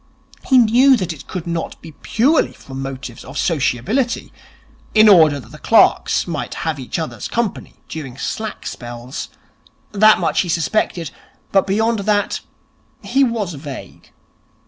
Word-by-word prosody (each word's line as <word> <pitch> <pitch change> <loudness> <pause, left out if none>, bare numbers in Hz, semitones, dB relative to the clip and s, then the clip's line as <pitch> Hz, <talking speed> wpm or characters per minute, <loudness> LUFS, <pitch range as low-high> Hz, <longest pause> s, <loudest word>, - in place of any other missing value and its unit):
He 260 - +5
knew 250 +3 +6
that 180 -5 -3
it 140 -3 -13
could 180 -3 -5
not 170 -1 -4
be 165 - -11
purely 255 - +1
from 135 0 -9
motives 130 -3 -7
of - - -9
sociability, 180 - 0 0.6
in 215 0 +7
order 160 -8 +6
that 120 - -14
the - - -12
clerks - - +3
might - - -4
have 160 -3 -1
each 130 - -4
other's 160 -2 -4
company 230 -4 -3
during 135 -6 -7
slack 220 +9 -5
spells. 120 +2 -7 0.6
That 215 +1 +6
much - - +1
he 180 - -4
suspected, 170 -1 -1 0.4
but 195 0 +3
beyond 220 +3 +1
that 205 0 0 0.6
he 275 +1 +2
was 225 -8 -1
vague. 140 -2 -9
180 Hz, 145 wpm, -19 LUFS, 140-220 Hz, 0.6 s, in